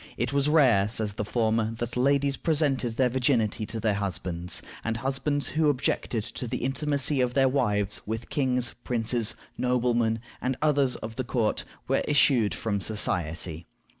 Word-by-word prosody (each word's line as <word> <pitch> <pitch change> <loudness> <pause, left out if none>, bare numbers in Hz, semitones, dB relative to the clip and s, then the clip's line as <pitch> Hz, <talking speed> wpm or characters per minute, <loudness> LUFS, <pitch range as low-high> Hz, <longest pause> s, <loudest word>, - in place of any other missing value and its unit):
It - - -1
was 140 +1 +2
rare, 125 -10 +4
says 110 -2 -1
the 105 - -3
former, 110 0 0
that 120 +1 -4
ladies 140 +2 +2
presented 140 -8 0
their 130 - +4
virginity 120 -4 +1
to 115 - -4
their 110 -1 +1
husbands; 90 -3 -2 0.2
and 115 0 -1
husbands 135 +3 -1
who 155 0 +2
objected 125 -4 -1
to 125 - -6
the 125 +1 -3
intimacy 140 +1 +1
of 125 -1 0
their 135 -1 +5
wives 105 -6 0
with 110 +2 -4
"kings, 125 -4 0
princes, 115 -1 0 0.2
noblemen, 120 -2 +1 0.2
and 130 0 -1
others 145 -4 +2
of 110 +2 -7
the 130 - -1
court," 115 -3 -1 0.2
were - - +2
eschewed 135 -7 +3
from 100 -3 -2
society. 85 -5 -1
120 Hz, 160 wpm, -27 LUFS, 110-135 Hz, 0.2 s, their